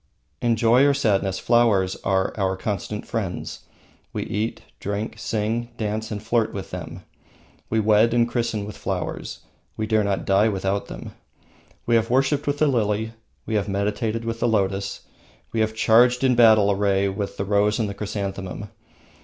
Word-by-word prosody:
In 120 -1 +2
joy 115 +4 +4
or 140 - +3
sadness, 100 -7 +1
flowers 105 -6 +3
are 95 -1 0
our 95 -2 0
constant 105 +1 -4
friends. 95 -6 -4 0.5
We - - -2
eat, 110 +3 -3 0.2
drink, 100 +2 -4
sing, 115 +2 -2
dance, 110 0 -2
and 105 -1 -5
flirt 115 0 +1
with 95 - -6
them. - - -7 0.7
We 110 - +1
wed 110 +1 +4
and 120 0 +3
christen 115 -4 -2
with 105 - -8
flowers. - - -4 0.4
We 110 - -1
dare 110 -1 +2
not 100 -1 -1
die 100 +3 +4
without 95 0 -1
them. - - -8 0.7
We 120 - +1
have 115 -1 +3
worshipped 135 +3 +1
with 145 0 0
the 155 - +3
lily, 110 -4 0 0.3
we 110 - -4
have 105 -1 0
meditated 105 +3 -1
with 115 0 -3
the 120 - +1
lotus, 100 -3 0 0.5
we 115 - -2
have 110 0 +1
charged 120 +3 +4
in 130 -1 +4
battle 110 -4 +6
array 100 0 +2
with 100 +1 -4
the 100 - -2
rose 105 +1 +2
and 110 - 0
the 100 - -4
chrysanthemum. 100 -1 -5
105 Hz, 170 wpm, -23 LUFS, 100-115 Hz, 0.7 s, battle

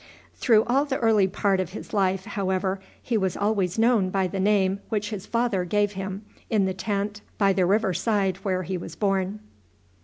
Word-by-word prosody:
Through 220 -4 +4
all 270 +4 +2
the 270 -2 -1
early 220 -4 +3
part 195 0 +1
of 185 -1 -3
his 215 - -8
life, 190 -2 +1
however, 190 -2 -1 0.2
he 230 -3 -1
was 190 -3 -1
always 200 -3 0
known 225 -4 +3
by 190 0 +1
the 185 +2 -3
name 195 -1 +2
which 210 -1 -2
his 205 -2 -6
father 230 -6 0
gave 205 +3 +1
him 195 +1 -6 0.2
in 210 -3 +2
the 190 - -1
tent 205 +1 -3 0.2
by 195 -2 +3
the 185 -2 +2
river 200 0 +2
side 195 0 0
where 190 -2 -2
he 185 +1 -3
was 165 -1 -8
born. 195 +2 -1
195 Hz, 190 wpm, -25 LUFS, 190-210 Hz, 0.2 s, Through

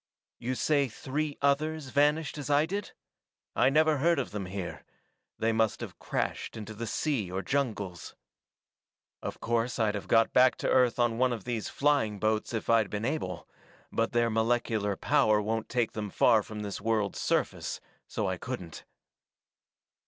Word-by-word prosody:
You 130 +2 -2
say 145 0 +2
three 145 +5 -3
others 150 +1 +1
vanished 150 +2 +2
as 145 - -5
I 145 +1 +4
did? 200 +4 -4 0.6
I - - +4
never 155 +1 +4
heard 170 +4 +3
of 140 - -2
them 100 -3 -4
here; 95 -1 -5 0.5
they 115 +1 +1
must 110 -1 +1
have - - -7
crashed - - -3
into 110 0 -7
the 115 +2 -5
sea 115 - -1
or 95 +1 -3
jungles. 105 - -2 1.1
Of - - -5
course, 120 +1 0
I'd 110 -3 +2
have 100 -3 -5
got 115 +2 +4
back 130 +1 +6
to - - -3
Earth 125 -2 +3
on 120 -1 +1
one 130 0 +3
of 115 -5 -4
these 120 -3 -3
flying 140 -8 +1
boats 110 +1 0
if 115 -2 -3
I'd 115 -3 +3
been 105 +1 -3
able, 150 +5 -3 0.4
but 115 0 0
their 120 -1 +2
molecular 110 -2 +1
power 105 +2 +3
won't 110 +1 -2
take 120 -3 0
them 105 -1 -4
far 110 +2 +4
from 105 +1 -7
this 100 -2 -5
world's 110 -2 0
surface, - - -1 0.3
so - - -2
I - - -1
couldn't. 85 -3 -6
115 Hz, 165 wpm, -29 LUFS, 105-140 Hz, 1.1 s, back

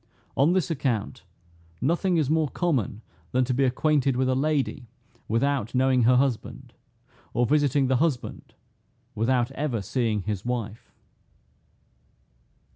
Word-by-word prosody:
On 145 +6 +3
this 185 -2 0
account, 125 -5 -2 0.6
nothing 170 - +1
is 155 -4 +1
more 155 0 +1
common 130 - -1 0.3
than 130 0 +3
to 130 - -1
be 135 +2 +2
acquainted 135 0 +1
with 130 +1 +1
a - - +2
lady 140 -2 -1 0.4
without 125 +1 0
knowing 130 -2 +3
her 125 +2 +5
husband, 130 -3 -1 0.6
or 120 +1 +3
visiting 145 0 +2
the 130 0 +2
husband 145 -3 -2 0.6
without 120 +3 +1
ever 135 -4 -2
seeing 110 0 -1
his 105 -2 -3
wife. 115 -3 -4
130 Hz, 125 wpm, -26 LUFS, 120-145 Hz, 0.6 s, her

